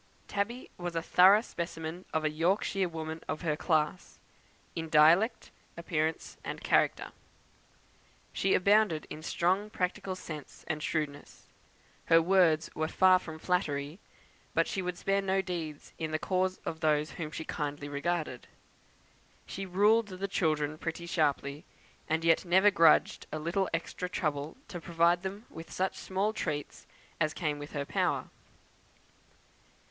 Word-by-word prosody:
Tabby 215 +5 -3
was 175 -1 -4
a 165 - 0
thorough 190 +5 +6
specimen 170 -3 -6
of 160 - 0
a - - +3
Yorkshire 185 +3 +1
woman 160 0 -5
of 155 - -3
her 155 -4 0
class, 155 +2 -1 0.6
in 165 -1 -4
dialect, 170 +9 +4 0.3
in - - -6
appearance, 160 -1 -2
and - - -4
in - - -14
character. - - +2 1.2
She 195 - +2
abounded 200 -4 +3
in 155 - -6
strong 185 +5 0
practical 190 0 -2
sense 155 -5 -9
and 155 -2 -2
shrewdness. 150 -3 -4 0.6
Her 165 - +6
words 165 -3 +3
were 155 0 -1
far 185 +2 +5
from 160 -3 -8
flattery; 155 -2 -1 0.6
but - - +4
she 195 - -2
would 180 -1 -3
spare 195 0 +1
no 195 0 +1
deeds 170 -6 -5
in 160 -1 -2
the 155 - 0
cause 185 +2 0
of 160 - -4
those 155 -1 +1
whom 155 -3 -5
she 160 +1 -6
kindly 145 -1 -4
regarded. 145 -2 -3 1.0
She 195 0 -6
ruled 210 +4 +4
the 190 0 -4
children 155 -5 0
pretty 165 +1 -4
sharply; 145 -3 0 0.5
and 160 +1 +1
yet 165 -1 +4
never 190 +3 +5
grudged 165 -5 +4
a 155 - -3
little 170 +5 -1
extra 170 +2 -3
trouble 155 - -2
to 175 -3 -6
provide 170 +1 +2
them 195 +4 -6
with 165 0 -10
such 190 +1 -1
small 195 +3 -1
treats 150 -8 -4 0.3
as 155 -1 0
came 150 -4 -2
within 145 0 -5
her - - -3
power. - - 0
170 Hz, 150 wpm, -30 LUFS, 155-185 Hz, 1.2 s, thorough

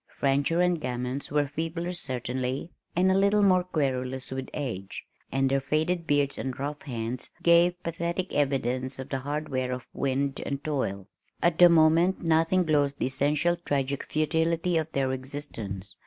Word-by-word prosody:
Fancher 140 +5 +2
and 180 -2 +2
Gammons 125 +1 -3
were 145 0 +2
feebler 165 +4 -3
certainly, 130 0 -3 0.2
and 185 +2 +4
a - - +3
little 200 +2 +4
more 185 -2 +4
querulous 130 -7 -2
with 130 0 -4
age, 110 -10 -5 0.3
and 135 +1 +2
their 135 +1 +2
faded 160 +5 -1
beards 145 -1 +1
and 130 -1 -4
rough 145 +2 -4
hands 120 -2 -4
gave 175 +1 +4
pathetic 170 +2 -3
evidence 130 -2 0
of 130 - -7
the 135 - -2
hard 145 +3 -3
wear 130 -1 -1
of 125 -1 -4
wind 140 0 -1
and 140 0 -4
toil. 100 -10 -2 0.4
At 170 -1 +2
the 175 0 +9
moment 165 +3 +4
nothing 165 +3 +3
glozed 145 -3 +2
the - - -1
essential 145 +6 +1
tragic 140 -4 -1
futility 165 +3 +1
of 160 -1 0
their 135 -1 0
existence. 130 -8 -6
145 Hz, 160 wpm, -27 LUFS, 130-165 Hz, 0.4 s, the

